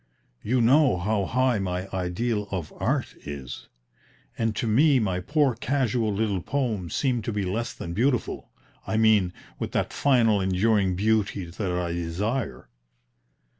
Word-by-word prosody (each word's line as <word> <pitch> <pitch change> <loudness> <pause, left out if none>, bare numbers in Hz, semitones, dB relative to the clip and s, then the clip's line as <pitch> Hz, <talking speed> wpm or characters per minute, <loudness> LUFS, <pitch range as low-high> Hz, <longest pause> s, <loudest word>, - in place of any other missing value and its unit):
You 125 +3 +1
know 130 -1 +4
how 100 +2 0
high 125 0 +1
my 90 0 -3
ideal 100 +4 -1
of 90 -6 -4
Art - - -1
is; 70 -3 -7 0.7
and 115 -2 -1
to 115 - -2
me 135 +6 +4
my 95 -6 0
poor 145 - +2
casual 120 -2 0
little 100 -2 -1
poems 110 - -2
seem 125 -4 +1
to 110 - -3
be 105 -2 -1
less 110 +6 -2
than 85 - -7
beautiful 125 +5 0 0.4
I 110 - 0
mean 110 -5 +4 0.3
with - - -4
that - - -1
final 115 -7 +3
enduring 95 0 +2
beauty 105 -1 +1
that 90 +3 -4
I 90 -1 -1
desire." 85 - -3
105 Hz, 145 wpm, -26 LUFS, 90-120 Hz, 0.7 s, know